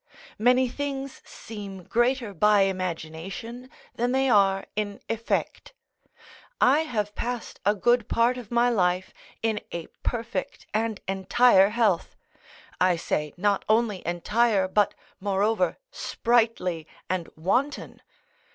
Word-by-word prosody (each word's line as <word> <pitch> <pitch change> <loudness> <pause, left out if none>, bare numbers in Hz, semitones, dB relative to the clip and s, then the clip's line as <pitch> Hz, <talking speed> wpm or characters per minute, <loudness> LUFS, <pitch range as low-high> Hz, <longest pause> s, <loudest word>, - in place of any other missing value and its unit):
Many 250 +3 +4
things 275 +1 -5
seem 200 -4 -9
greater 240 0 0
by 210 +3 +4
imagination 185 +6 -4 0.2
than 245 +2 -1
they 265 -1 +2
are 195 -2 +3
in 205 -1 -3
effect; 230 - -2 0.9
I 275 +4 +5
have 215 -10 -2
passed 245 +1 -4
a 205 - +4
good 240 +2 +2
part 235 +2 +3
of 245 -5 -9
my 235 0 +3
life 185 -5 +1 0.3
in 220 -2 +1
a 170 -1 -4 0.2
perfect 230 -5 -4
and 220 -1 -1
entire 195 +1 +4
health; 210 -6 +1 0.6
I 180 -1 +4
say, 150 -3 -2
not 200 +1 +1
only 215 -4 +2
entire, 195 +4 +1
but, 205 +1 +2 0.2
moreover, 200 -1 +1
sprightly 225 -9 0 0.2
and 185 -3 -2
wanton. 250 - -1
210 Hz, 115 wpm, -26 LUFS, 190-240 Hz, 0.9 s, I